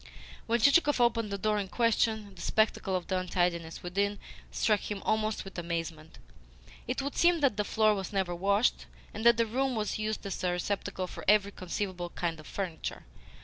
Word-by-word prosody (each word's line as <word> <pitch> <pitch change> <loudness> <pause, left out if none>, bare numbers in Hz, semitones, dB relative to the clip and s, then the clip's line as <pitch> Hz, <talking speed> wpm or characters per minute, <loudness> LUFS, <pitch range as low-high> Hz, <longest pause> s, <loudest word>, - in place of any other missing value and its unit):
When 235 +1 +2
Chichikov 285 +3 +4
opened 230 -2 +2
the 200 - -1
door 210 +1 +1
in 200 - -3
question, 220 -1 +1
the 175 - -11
spectacle 210 -1 +1
of 180 - -2
the 185 -1 0
untidiness 175 -2 -1
within 200 +3 0 0.3
struck 210 -2 +2
him 205 -2 -4
almost 215 -1 0
with 195 -2 -7
amazement. 165 -2 -5 0.7
It 255 +3 -2
would 280 - -4
seem 345 -1 +4
that 275 -7 +3
the 210 - 0
floor 215 +1 +3
was 195 -3 -4
never 190 -3 0
washed, 200 +6 +1 0.3
and 220 - -5
that 235 -1 +7
the 230 - +3
room 260 +3 0
was 215 -1 -2
used 215 0 -3
as 195 - -4
a 180 - +2
receptacle 190 +1 -2
for - - -9
every 205 0 +4
conceivable 185 -2 -4
kind 170 -2 -3
of 155 - -12
furniture. 180 -5 -5
200 Hz, 190 wpm, -30 LUFS, 180-220 Hz, 0.7 s, that